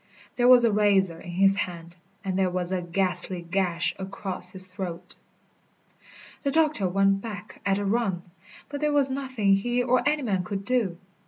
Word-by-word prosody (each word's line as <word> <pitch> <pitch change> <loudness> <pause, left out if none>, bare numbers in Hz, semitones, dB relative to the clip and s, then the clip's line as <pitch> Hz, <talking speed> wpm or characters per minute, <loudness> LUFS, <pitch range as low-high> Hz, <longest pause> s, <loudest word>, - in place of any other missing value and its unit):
There 245 0 +3
was 250 -1 +7
a 230 - +3
razor 195 -5 +2
in - - -10
his 195 +3 +3
hand, 170 -3 -5 0.3
and 190 -1 -1
there 190 -1 +2
was 180 0 -3
a 185 -1 0
ghastly 180 0 0
gash 175 -1 -1
across 190 -1 -5
his 185 0 -4
throat. 185 -2 -7 1.3
The 280 - 0
doctor 300 - +2
went 195 +1 +2
back 205 -3 -8
at 195 0 +2
a 205 - -2
run, 195 -4 0 0.4
but 285 0 -6
there 300 0 +2
was 280 -2 +3
nothing 260 -7 0
he 245 +4 0
or 250 +1 +2
any 300 -1 -1
man 195 -6 0
could 195 0 -5
do. 225 -9 0
195 Hz, 175 wpm, -26 LUFS, 185-240 Hz, 1.3 s, was